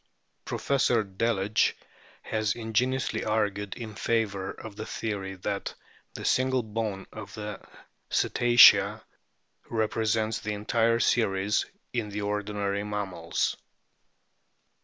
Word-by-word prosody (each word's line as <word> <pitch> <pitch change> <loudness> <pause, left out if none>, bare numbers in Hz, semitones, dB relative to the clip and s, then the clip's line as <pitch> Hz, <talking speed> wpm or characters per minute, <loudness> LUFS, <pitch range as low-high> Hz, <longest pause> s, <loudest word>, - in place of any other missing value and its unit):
Professor 125 -5 +1
Delage 105 +1 +1 0.5
has 110 -1 -1
ingeniously 120 +3 0
argued 105 -2 -1
in 110 -3 -7
favour 105 -4 -1
of 110 -2 -8
the 110 +1 -6
theory 100 -3 -4
that 100 +2 -4 0.4
the - - -6
single 130 -1 +2
bone 105 -3 -3
of - - -8
the 105 -1 -6 0.5
Cetacea 110 -3 +6 0.7
represents 110 0 0
the 105 - -3
entire 115 +2 +1
series 100 -4 +2 0.3
in 115 -4 -1
the 105 +1 -4
ordinary 100 -1 -2
mammals. 95 -5 -2
105 Hz, 100 wpm, -28 LUFS, 100-115 Hz, 0.7 s, Cetacea